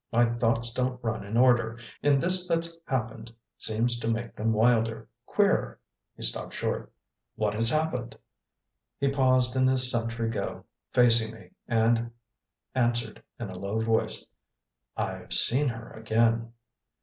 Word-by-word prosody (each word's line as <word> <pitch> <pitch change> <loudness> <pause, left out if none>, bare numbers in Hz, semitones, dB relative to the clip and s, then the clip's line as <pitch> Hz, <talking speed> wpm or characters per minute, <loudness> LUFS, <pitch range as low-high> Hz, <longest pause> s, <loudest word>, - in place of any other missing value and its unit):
My 120 +1 +4
thoughts 115 0 +1
don't 125 0 -1
run 110 -3 -2
in 105 +3 -3
order, 120 -2 +3 0.2
and 145 -1 +3
this 180 +3 +2
that's 165 -1 0
happened 115 -3 -3 0.3
seems 120 +2 +1
to 115 - -2
make 115 +1 -3
them 110 +1 0
wilder, 115 0 +1 0.2
queerer - - +1 0.2
" - - -58
He - - -8
stopped - - -1
short. - - -3 0.4
"What 105 -1 -1
has 115 +2 +4
happened?" 130 -6 -1 0.8
He 140 - +1
paused 130 -2 +2
in 130 0 +3
his 130 -1 +4
sentry 115 -1 -1
go, 115 - -5 0.3
facing 115 -2 +4
me, 95 -5 -16 0.2
and 115 0 +2 0.6
answered, 120 -3 0 0.2
in 110 -5 -5
a 90 - -8
low 100 +3 -3
voice: 110 0 0 0.7
"I've - - -4
seen 140 +5 +3
her 115 -2 -5
again." 115 +1 0
115 Hz, 145 wpm, -27 LUFS, 115-125 Hz, 0.8 s, My